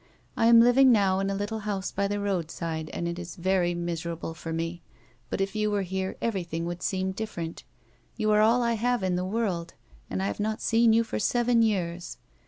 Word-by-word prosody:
I 225 - +3
am 230 0 +8
living 250 +2 +6
now 195 -4 +3
in 195 0 0
a 195 - -1
little 205 +2 -3
house 205 -3 -3
by 200 0 0
the 205 +1 -2
roadside 165 -5 -3
and 170 - -3
it 170 +1 -4
is 175 -1 -7
very 180 -1 +1
miserable 170 -1 -4
for 165 0 -7
me, 165 +1 -3 0.5
but - - -3
if 195 +2 -2
you 215 0 +1
were 205 -1 0
here 190 +1 -3
everything 170 -7 -2
would 175 +1 -5
seem 190 0 -1
different. 190 -5 -5 0.5
You 215 -2 +1
are 210 0 +5
all 235 +3 +4
I 235 0 +1
have 240 0 0
in 185 -1 +1
the 180 - -1
world, 185 -4 -2 0.3
and 95 0 -2
I - - 0
have 100 - -3
not 215 +1 -1
seen 230 0 +3
you 225 +1 +4
for 225 - -4
seven 240 +2 +2
years. 180 -6 -1
195 Hz, 210 wpm, -27 LUFS, 170-220 Hz, 0.5 s, am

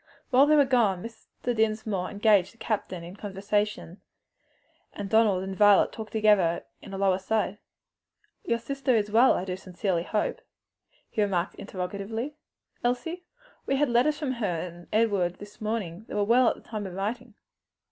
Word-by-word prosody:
While 270 +3 +6
they 305 - +5
were 290 -2 +6
gone 225 -9 +2
Mr. 230 +1 -6
Dinsmore 215 -4 0
engaged 205 -3 +3
the - - -25
captain 195 -6 -3
in 175 +3 -9
conversation, 205 -2 -2 0.9
and 200 -1 -6
Donald 215 -4 +4
and 190 0 -5
Violet 205 0 +5
talked 220 -1 -8
together 210 -6 +3 0.2
in 195 - -11
a 195 - -5
low 195 -1 +3
aside. 205 +1 -1 0.8
"Your 235 - 0
sister 270 +1 -1
is 210 -1 0
well, 235 +4 +6
I 185 - -2 0.6
hope?" 215 - -2 0.7
he 215 - -2
remarked 190 -3 0
interrogatively. 200 +7 -5 0.5
"Elsie? 325 +9 -2 0.4
We 275 - +2
had 290 0 +2
letters 255 +6 +3
from 290 -4 -2
her 235 -5 -2
and 175 -1 -9
Edward 200 -5 +2
this 205 +1 -13
morning. 215 -3 -3
They - - -7
were 205 - +2
well 240 +4 +4
at - - -2
the - - -15
time 210 -3 -5
of 180 - -8
writing." 225 +4 -4
210 Hz, 160 wpm, -27 LUFS, 195-235 Hz, 0.9 s, While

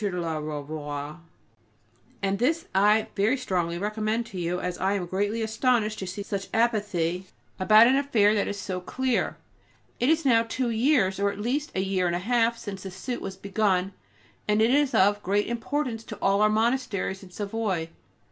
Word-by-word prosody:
de 205 - 0
la 165 -2 -2
Ravoir, 150 0 -5 1.0
and 195 0 0
this 320 +7 +1
I 210 +3 +3
very 215 +7 +2
strongly 175 -8 -1
recommend 215 +4 -1
to 195 -5 -7
you, 175 +1 -1
as 180 -1 -4
I 190 +1 +1
am 195 -3 -1
greatly 205 +5 -1
astonished 220 -1 +1
to 190 - -5
see 185 +3 -5
such 200 -1 -4
apathy 195 -6 0 0.3
about 215 +4 +7
an 255 +3 +4
affair, 235 -7 +3
that 205 -2 +1
is 205 - -4
so 185 -2 -4
clear. 255 +5 -1 0.6
It 245 - +2
is 320 0 +2
now 230 -4 +5
two 235 +2 -2
years, 225 -5 +2
or 200 0 +2
at - - -9
least 260 +8 -2
a 190 - +1
year 190 -2 0
and 175 - 0
a 180 +2 -4
half, 235 -1 +2
since 200 -4 -7
the 190 - -6
suit 240 +7 -5
was 190 -1 -6
begun, 195 -2 0 0.5
and 210 0 +2
it 225 +2 +4
is 285 0 +2
of 205 +2 +4
great 205 +2 +1
importance 235 0 -2
to 215 - -8
all 195 +1 +2
our 215 - +5
monasteries 220 -4 0
in 190 - -12
Savoy. 200 -3 -2
205 Hz, 185 wpm, -26 LUFS, 190-230 Hz, 1.0 s, about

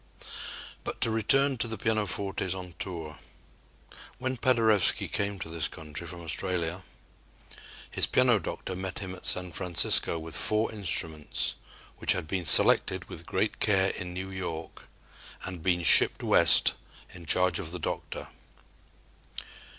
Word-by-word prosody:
But - - -5
to 115 - +3
return 135 +4 +3
to 115 - +2
the 110 -1 -6
pianofortes 100 -3 -2
on 90 -2 -9
tour. 80 -6 -6 1.0
When 130 +1 -3
Paderewski 115 -5 +2
came 100 0 -3
to 90 - -7
this 80 -1 -1
country 80 +1 -9
from 85 0 -9
Australia, 85 +2 -1 1.1
his - - +1
piano - - +3
doctor 95 - -6
met 95 +1 -6
him 95 -3 -6
at 95 - -8
San 90 -1 -1
Francisco 85 -1 +2
with 80 0 -7
four 110 +1 +2
instruments 80 -7 0 0.5
which - - +2
had - - -5
been 90 0 -3
selected - - +5
with - - -10
great - - -2
care 95 -2 +2
in 90 -1 -7
New 95 +2 -7
York 85 -4 -7 0.6
and 90 -3 -7
been 90 0 0
shipped - - +6
West - - +5 0.4
in 85 -2 -13
charge 90 +1 +2
of 80 - -6
the 90 - -4
"doctor." 80 - -6
90 Hz, 140 wpm, -27 LUFS, 85-100 Hz, 1.1 s, shipped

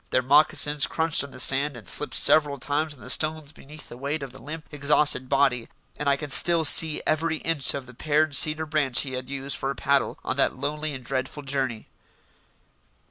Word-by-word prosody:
Their 130 - 0
moccasins 145 +1 +3
crunched 160 -2 0
on 140 - -9
the 130 - -12
sand 135 +1 +2
and 110 -6 -14
slipped - - +2
several 145 -2 +3
times 145 +3 -2
on 125 - -20
the - - -11
stones 155 -1 0
beneath 150 0 -14
the 120 - -12
weight 140 +3 -4
of 135 - -9
the 135 - -15
limp, 155 +2 -9
exhausted 145 -2 0
body, 135 -4 0 0.3
and 150 -1 -3
I 140 - +1
can 145 0 -8
still 170 +2 +4
see 155 +1 +6
every 160 +1 -1
inch 150 -5 -1
of 140 -2 -7
the 125 - -15
pared 150 +3 -1
cedar 155 +2 +2
branch 145 -5 0
he 135 -2 -7
had 130 0 -7
used 140 0 -5
for 135 - -4
a 140 - -4
paddle 140 +1 -1
on - - -3
that - - 0
lonely 150 +2 -4
and 130 -2 -11
dreadful 130 +3 -5
journey. 135 -5 -3
140 Hz, 205 wpm, -24 LUFS, 135-155 Hz, 0.3 s, see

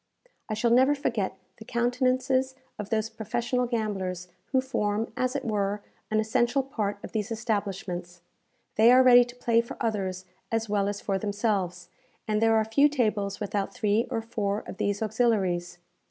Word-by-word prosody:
I 215 - -1
shall 230 +2 +1
never 260 +4 +5
forget 215 -9 -2 0.2
the 220 - -10
countenances 255 +2 +1 0.2
of 210 -1 -5
those 220 -1 0
professional 240 +3 -2
gamblers 190 -6 -3 0.2
who 265 - +2
form, 220 -4 -1
as 255 +1 -1
it 280 - -2
were, 205 -2 -1 0.3
an 215 - +2
essential 240 +5 +1
part 210 -6 -3
of - - -7
these 215 -1 -2
establishments. 195 -6 -3 0.6
They 225 +3 +7
are 255 +1 +7
ready 245 -1 +8
to 245 0 -11
play 235 -2 +2
for 235 - -9
others 190 -4 -2 0.3
as 225 0 0
well 205 -1 +1
as 205 0 -3
for 195 -1 -1
themselves, 200 -4 -1 0.4
and 215 0 +1
there 225 0 +4
are 220 -1 +3
few 280 +7 +4
tables 215 -8 0
without 200 -1 -2
three 215 +1 +1
or 225 - -2
four 210 -2 -2
of - - -8
these 205 +1 -1
auxiliaries. 205 -7 0
220 Hz, 170 wpm, -27 LUFS, 200-240 Hz, 0.6 s, ready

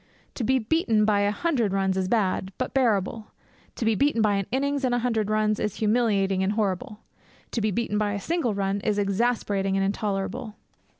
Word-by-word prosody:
To 250 - -4
be 260 +4 +3
beaten 225 -4 +1
by 210 -1 +3
a 205 0 +2
hundred 230 - 0
runs 190 -1 +1
is 190 -1 0
bad, 190 -3 0
but - - -3
bearable; 220 -4 +1 0.5
to 230 - -3
be 225 - +3
beaten 280 +3 +1
by 215 -2 +3
an 195 -1 -1
innings 280 +2 0
and 250 -2 +2
a 245 0 -1
hundred 220 -4 0
runs 215 0 +1
is 210 - -2
humiliating 210 -4 +1
and 190 +2 +1
horrible; 210 +2 -2 0.5
to 230 - -1
be 215 - +1
beaten 210 0 -1
by 205 -1 0
a 205 - -2
single 310 - -1
run 195 0 -1
is 210 0 0
exasperating 200 -1 0
and 195 - +1
intolerable. 210 +3 -3
215 Hz, 195 wpm, -25 LUFS, 195-235 Hz, 0.5 s, be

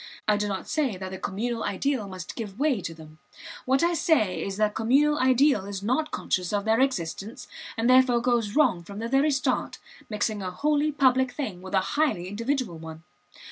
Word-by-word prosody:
I 210 - +4
do 210 0 -1
not 195 -2 -4
say 280 -11 0
that 190 0 -6
the 190 - -6
communal 225 +3 -3
ideal 230 +2 -1
must 185 -2 -8
give 210 -4 -6
way 280 -8 +1
to 165 - -5
them. 155 -1 -14 0.5
What 265 +4 +2
I 345 +1 +3
say 310 - +1
is 195 0 -4
that 215 0 +3
the - - -17
communal 285 +7 +2
ideal 255 -5 +3
is 200 -1 -5
not 265 +8 0
conscious 180 -2 -2
of 205 0 -1
their 220 +1 +3
existence, 235 - -2 0.3
and 225 +1 +1
therefore 255 -1 +5
goes 235 -3 0
wrong 250 - +3
from 200 +3 -10
the 225 +2 -3
very 270 +5 +3
start, 270 -2 -1 0.3
mixing 210 -1 -1
a 185 - -3
wholly 295 +9 +1
public 260 -3 +3
thing 215 -12 -5
with 190 +1 -4
a 190 - +4
highly 290 - +1
individual 230 - -2
one. 160 0 -9
225 Hz, 200 wpm, -26 LUFS, 195-270 Hz, 0.5 s, therefore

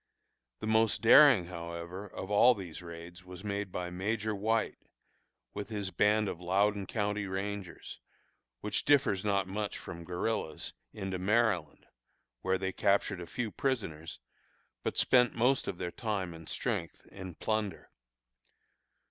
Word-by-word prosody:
The - - -3
most 110 +1 +3
daring, 120 - +8
however, 85 +2 -6
of 95 +1 -7
all 120 +4 +6
these 90 -5 -7
raids 85 +1 -10
was 90 +1 -10
made 100 -2 -3
by 90 0 -4
Major 105 +4 -1
White, 110 +2 0 0.7
with 105 - -5
his 100 -3 -3
band 105 +1 +3
of 90 - -5
Loudon 100 +2 +1
County 105 -1 -1
rangers, 95 -1 -5 0.6
which 105 - 0
differs 135 -9 +3
not 100 -2 +1
much 105 +2 -3
from 85 0 -8
guerillas, 90 0 -3 0.2
into 95 -3 -4
Maryland, 100 -5 +1 0.6
where 95 0 +1
they 95 0 -2
captured 100 0 +1
a 85 - -7
few 120 +1 -3
prisoners, 90 - -2 0.6
but - - -3
spent 125 -2 +5
most 125 +3 +2
of 90 - -3
their 90 -1 -3
time 100 -6 -2
and 80 -1 -10
strength - - -3
in 95 -3 -8
plunder. 110 0 -2
100 Hz, 140 wpm, -31 LUFS, 90-110 Hz, 0.7 s, daring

